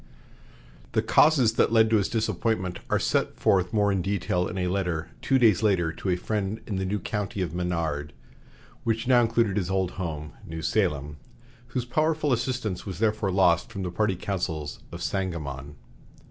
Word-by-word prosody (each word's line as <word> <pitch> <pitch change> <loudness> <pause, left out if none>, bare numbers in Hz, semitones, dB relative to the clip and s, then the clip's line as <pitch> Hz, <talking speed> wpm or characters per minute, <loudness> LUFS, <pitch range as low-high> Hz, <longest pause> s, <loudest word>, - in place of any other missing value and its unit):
'" - - -24
The - - +2
causes 140 -7 +5
that - - +4
led 110 -1 +4
to 110 - +5
his 100 - 0
disappointment 110 -4 -1
are - - +3
set - - 0
forth 95 -2 +2
more 105 -2 +2
in 95 -2 +1
detail 90 -2 0
in - - -5
a 90 - 0
letter, 90 -7 -2
two 135 - +3
days 110 -7 +4
later, 95 -6 +2
to 95 - -5
a 90 - +3
friend 105 +3 -2
in 100 - -3
the 95 0 -1
new 105 +2 0
county 105 -1 -3
of 85 -3 -4
Menard, 85 -4 -2 0.7
which 115 0 -1
now 125 -2 +6
included 115 -3 +1
his 95 -3 -1
old 95 -1 0
home, 75 -3 -4
New 80 0 -7
Salem, 75 -7 0 0.5
whose 125 0 -3
powerful 155 +2 +1
assistance 120 -5 -2
was 95 -4 -6
therefore 105 -1 +1
lost 90 +2 +3
from 100 -4 -5
the 90 - -3
party 100 +1 +1
councils 85 -6 -3
of 85 0 -6
Sangamon. 75 -8 -3
95 Hz, 180 wpm, -26 LUFS, 85-110 Hz, 0.7 s, now